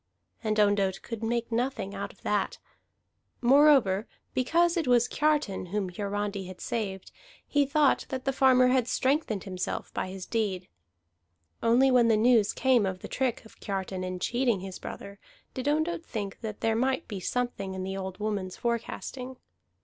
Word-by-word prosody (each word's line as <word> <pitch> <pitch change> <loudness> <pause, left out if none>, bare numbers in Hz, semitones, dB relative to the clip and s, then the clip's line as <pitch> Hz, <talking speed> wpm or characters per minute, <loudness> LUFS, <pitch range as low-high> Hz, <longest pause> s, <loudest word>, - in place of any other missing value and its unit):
And 215 -1 0
Ondott 200 -2 +2
could 230 -2 -6
make 235 +1 -1
nothing 230 -4 -1
out - - -5
of - - -25
that; - - 0 0.8
moreover, 260 -6 +5 0.3
because 335 +7 +2
it 330 -5 -1
was 245 -1 +4
Kiartan 295 -13 0
whom 195 0 -2
Hiarandi 200 0 -3
had 185 -1 -10
saved, 195 -5 -4 0.3
he 285 -1 +2
thought 285 -1 +3
that 260 -1 -4
the 270 - +1
farmer 255 -1 +5
had 250 -2 +2
strengthened 260 - 0
himself 185 -2 -4
by - - -2
his 190 -1 -7
deed. 195 -5 -2 0.9
For - - -2
only 255 +3 +5
when 245 -2 +5
the 225 -2 +4
news 225 -2 +4
came 250 -6 +3
of 185 -1 -4
the - - -6
trick 255 -4 -1
of 220 - -17
Kiartan 190 -2 -3
in 185 0 -3
cheating 235 +1 0
his 190 -1 -7
brother 200 0 -8 0.3
did 260 +1 -4
Ondott 315 +3 0
think 205 -9 -5
that 215 -2 -6
there 225 -1 +2
might 260 +3 0
be 205 -4 -5
something 200 -3 -2
in 185 - -4
the 190 +1 -4
old 190 -1 -5
woman's 205 -3 -3
forecasting. 250 +2 -4
225 Hz, 170 wpm, -28 LUFS, 195-260 Hz, 0.9 s, moreover